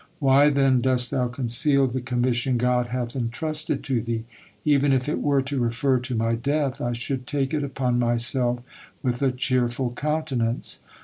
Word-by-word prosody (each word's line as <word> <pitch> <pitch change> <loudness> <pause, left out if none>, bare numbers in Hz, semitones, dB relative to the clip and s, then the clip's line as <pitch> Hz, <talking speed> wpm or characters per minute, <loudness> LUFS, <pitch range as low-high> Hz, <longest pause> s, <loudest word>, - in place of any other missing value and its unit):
Why, 140 -1 +5
then, 135 -3 +3
dost 125 -1 +2
thou 125 -1 +1
conceal 135 +3 +2
the 130 0 -2
commission 125 0 0
God 125 0 +1
hath 120 0 -4
entrusted 150 +6 -2
to 130 -5 0
thee? 115 0 -3 0.4
Even 145 -2 +3
if 130 0 0
it 150 - -1
were 140 -2 +2
to 135 +1 -2
refer 120 +3 +1
to 125 0 -4
my 115 +1 +1
death, 140 +3 -1
I 120 0 -1
should 125 +2 -4
take 140 0 -1
it 150 -2 0
upon 130 -3 -1
myself 120 +1 +1 0.4
with 125 0 -1
a 135 -2 +3
cheerful 125 -1 0
countenance." 135 -5 -1
125 Hz, 170 wpm, -24 LUFS, 120-140 Hz, 0.4 s, Why